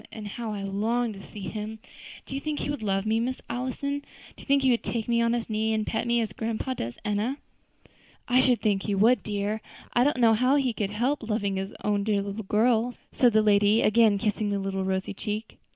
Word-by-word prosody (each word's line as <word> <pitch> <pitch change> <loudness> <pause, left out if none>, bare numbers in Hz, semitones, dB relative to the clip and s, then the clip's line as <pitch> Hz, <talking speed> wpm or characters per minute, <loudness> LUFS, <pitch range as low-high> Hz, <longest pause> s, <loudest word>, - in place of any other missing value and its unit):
how 230 +1 -5
I 205 -2 -4
long 220 +4 0
to 195 - -10
see 210 - -10
him! 215 +2 -5 0.5
Do - - -8
you 275 - -3
think 305 0 -3
he - - -2
would 290 - -4
love 195 -1 0
me, 220 +1 +2
Miss 255 +2 -2
Allison? 260 +3 -2 0.4
Do - - -14
you - - -13
think 280 -1 +3
he 260 - +5
would 235 - +2
take 230 -2 -3
me 235 -1 +2
on 230 0 +2
his 240 -1 -2
knee 220 0 0
and 215 -1 -1
pet 225 +1 -2
me, 235 0 +3
as 215 -4 -3
grandpa 230 +4 -2
does 120 - -5
Enna?" 210 +6 0 0.9
"I 255 +1 +5
should 250 -2 +3
think 200 -3 +1
he 205 0 -1
would, 225 +6 +4
dear; 210 +1 -2 0.3
I 245 - +4
don't 290 0 +2
know 230 -2 +5
how 255 +5 +3
he 265 -4 +1
could 205 -3 -2
help 245 +8 0
loving 210 -3 -1
his 195 +1 -4
own 205 -1 +1
dear 205 -1 +1
little 200 +2 -4
girl," 230 +3 +2 0.2
said 245 -2 +4
the 215 0 +5
lady, 205 +1 +4
again 215 -1 +5
kissing 210 0 -1
the 200 - 0
little 195 -1 -2
rosy 190 +1 -1
cheek. 210 +3 -5
220 Hz, 230 wpm, -27 LUFS, 205-240 Hz, 0.9 s, he